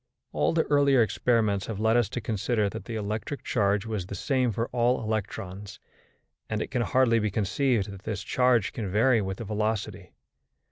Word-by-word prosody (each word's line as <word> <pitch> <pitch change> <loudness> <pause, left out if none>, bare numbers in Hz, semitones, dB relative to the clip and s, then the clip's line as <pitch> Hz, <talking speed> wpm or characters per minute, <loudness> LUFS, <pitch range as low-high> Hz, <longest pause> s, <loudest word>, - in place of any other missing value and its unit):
All - - +1
the 165 -1 +2
earlier 140 -4 +4
experiments 110 -3 +1
have 110 -3 -4
led 110 +1 +3
us 120 -5 +2
to - - -3
consider 110 0 0
that 110 - -8
the 115 - -5
electric 110 +6 -4
charge 100 +1 +1
was 105 -5 -3
the 100 - -6
same 130 +4 0
for 115 +2 -1
all 120 0 +1
electrons, 100 -2 -4 0.7
and 110 - -1
it - - -4
can 125 -3 0
hardly 120 -1 +3
be 110 -1 0
conceived 105 +1 0
that 100 -1 -10
this 105 -1 -4
charge 125 -2 +2
can 110 -7 -4
vary 115 +4 +3
with 95 -1 -4
the 115 - -6
velocity. 105 -2 -3
110 Hz, 185 wpm, -27 LUFS, 100-120 Hz, 0.7 s, earlier